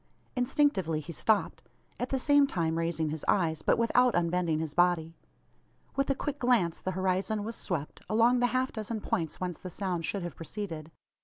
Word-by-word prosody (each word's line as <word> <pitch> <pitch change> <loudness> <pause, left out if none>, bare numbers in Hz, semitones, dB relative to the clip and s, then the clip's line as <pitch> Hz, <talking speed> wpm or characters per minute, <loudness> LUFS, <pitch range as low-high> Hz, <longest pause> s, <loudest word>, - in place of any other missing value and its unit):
Instinctively 245 - +2
he 170 +3 -8
stopped; 210 +7 +1 0.4
at 250 - -2
the 270 - 0
same 285 +1 +4
time 165 - -1
raising 165 -2 0
his 155 0 -4
eyes, 160 -5 +2
but - - +2
without 245 +2 +3
unbending 170 -1 +1
his 155 -2 -3
body. 170 -1 +2 0.8
With 275 +1 0
a 275 - +2
quick 290 +1 -4
glance 235 -10 +2
the 185 - -2
horizon 190 +3 0
was 225 +2 -5
swept, 155 -6 -4
along 230 +3 +4
the 245 - +3
half 255 +2 0
dozen 220 0 -4
points 165 -5 -2
whence 180 -2 -3
the 185 - -7
sound 180 -2 -2
should 200 -3 -2
have 175 - -5
proceeded. 165 -3 -6
185 Hz, 180 wpm, -30 LUFS, 165-235 Hz, 0.8 s, same